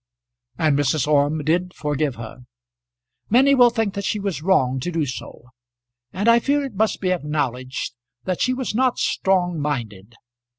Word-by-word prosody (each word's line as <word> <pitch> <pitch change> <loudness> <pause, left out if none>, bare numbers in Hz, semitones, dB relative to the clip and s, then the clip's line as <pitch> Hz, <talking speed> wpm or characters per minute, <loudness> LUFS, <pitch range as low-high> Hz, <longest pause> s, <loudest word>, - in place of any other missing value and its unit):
And 155 -3 +2
Mrs. 145 -1 +1
Orme 150 +1 +2
did 180 +4 0
forgive 150 -2 -1
her. 115 +1 -9 0.9
Many 265 +5 +5
will 245 -3 +6
think 225 -4 -1
that 200 -1 -4
she 210 - -1
was 195 -6 -3
wrong 135 -8 +2
to 175 +7 -3
do 165 -3 0
so, 125 -2 -8 0.6
and 200 - -2
I 235 0 +6
fear 285 +4 +1
it 265 - -7
must 215 +2 0
be 185 -2 0
acknowledged 140 -7 -2 0.3
that 185 -2 -2
she 255 0 +1
was 260 -3 -3
not 255 +2 +1
strong 180 -3 0
minded. 115 -7 -4
165 Hz, 165 wpm, -22 LUFS, 140-210 Hz, 0.9 s, will